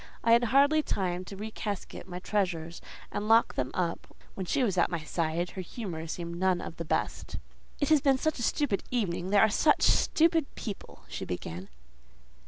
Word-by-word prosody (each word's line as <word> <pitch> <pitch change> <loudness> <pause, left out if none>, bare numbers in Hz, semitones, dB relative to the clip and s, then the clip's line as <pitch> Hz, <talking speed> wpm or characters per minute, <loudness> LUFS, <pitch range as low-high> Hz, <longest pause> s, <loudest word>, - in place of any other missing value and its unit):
I 230 - +3
had 235 +1 +6
hardly 280 +6 +4
time 185 -9 -2
to 195 - -9
recasket 210 -2 -5
my 180 -1 -6
treasures 180 -4 -2 0.3
and 205 +1 -3
lock 225 +1 +5
them 130 -1 -1
up 175 -2 -3 0.2
when 190 -2 -5
she 270 - +1
was 200 -6 +1
at 175 - +3
my 170 -3 -3
side 165 +2 -1
her 190 - -5
humour 175 -4 -6
seemed 170 +1 -5
none 185 -1 +2
of 165 - -7
the 170 - -5
best. - - -2 0.4
"It 285 - +1
has 310 -3 +5
been 275 -1 +4
a 315 +4 +1
stupid 240 -3 +1
evening: 185 -7 -1
they 205 - +3
are 220 - +7
stupid 315 +5 +3
people," 210 -4 -7
she - - -5
began. 90 +1 -5
195 Hz, 180 wpm, -29 LUFS, 170-235 Hz, 0.4 s, are